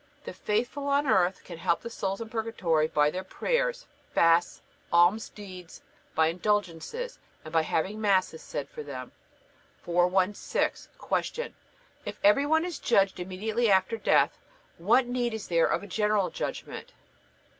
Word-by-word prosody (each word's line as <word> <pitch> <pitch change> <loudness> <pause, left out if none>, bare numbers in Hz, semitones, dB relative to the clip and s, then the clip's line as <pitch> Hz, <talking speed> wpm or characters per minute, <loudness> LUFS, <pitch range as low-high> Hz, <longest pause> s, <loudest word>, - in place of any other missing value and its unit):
The - - -7
faithful 245 +7 -2
on 285 +1 +2
earth 185 -7 +2
can 170 -2 -9
help 170 0 +1
the 235 - -6
souls 195 -1 -3
in 225 - -6
Purgatory 190 -9 0
by 150 -2 +2
their 185 +3 -4
prayers, - - -1 0.3
fasts, 165 +1 +4 0.3
alms 175 +6 +4
deeds; 185 -4 -11 0.3
by 160 - +4
indulgences, 205 - -2 0.3
and 155 - -9
by 165 - +4
having 190 +7 -1
Masses 190 -5 +2
said 145 -2 -5
for - - -8
them. 130 -4 -7 0.7
416. 180 +3 0 0.4
Q. 485 +1 -5 0.5
If - - -6
every 210 +8 +5
one 320 +2 +3
is 355 -2 -5
judged 195 -6 +2
immediately 210 +6 -1
after 190 +3 +3
death, 225 - +2 0.4
what 230 +9 +4
need 245 -2 -1
is 220 - -6
there 170 -1 +3
of - - -1
a - - -8
General 210 -3 +1
Judgment? - - -6
195 Hz, 145 wpm, -28 LUFS, 170-230 Hz, 0.7 s, every